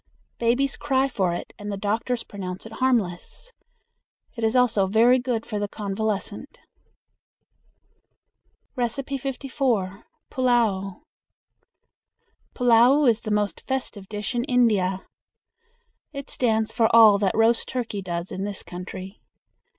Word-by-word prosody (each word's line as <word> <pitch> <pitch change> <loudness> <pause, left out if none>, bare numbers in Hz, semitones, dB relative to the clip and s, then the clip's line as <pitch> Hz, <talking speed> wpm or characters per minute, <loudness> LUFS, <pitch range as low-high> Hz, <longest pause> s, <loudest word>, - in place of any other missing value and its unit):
"Babies 245 +4 +1
cry 270 -2 +1
for 190 -9 0
it, 175 - -6
and 205 0 -5
the 200 - -3
doctors 225 +4 -1
pronounce 185 -2 -7
it 225 - -10
harmless." 245 - -1 0.8
It 230 - -5
is 220 +2 +1
also 225 -6 +3
very 235 +6 +4
good 245 -3 -2
for 210 -3 -4
the 205 - -1
convalescent. 210 +5 -4 2.2
54. 255 -5 -2 0.3
Pullao. 225 -7 0 1.5
Pullao 245 +4 +5
is 230 -1 +3
the 215 - -5
most 210 -1 -1
festive 235 -7 -3
dish 210 +2 -4
in 240 0 0
India. 210 -8 +2 1.1
It 280 -2 -8
stands 220 -3 +1
for 225 -2 +3
all 215 -3 +8
that 195 -2 0
roast 225 +1 +3
turkey 230 -5 -3
does 175 -1 -4
in 190 - -4
this 200 -1 -4
country. 185 +2 -8
225 Hz, 120 wpm, -24 LUFS, 200-250 Hz, 2.2 s, all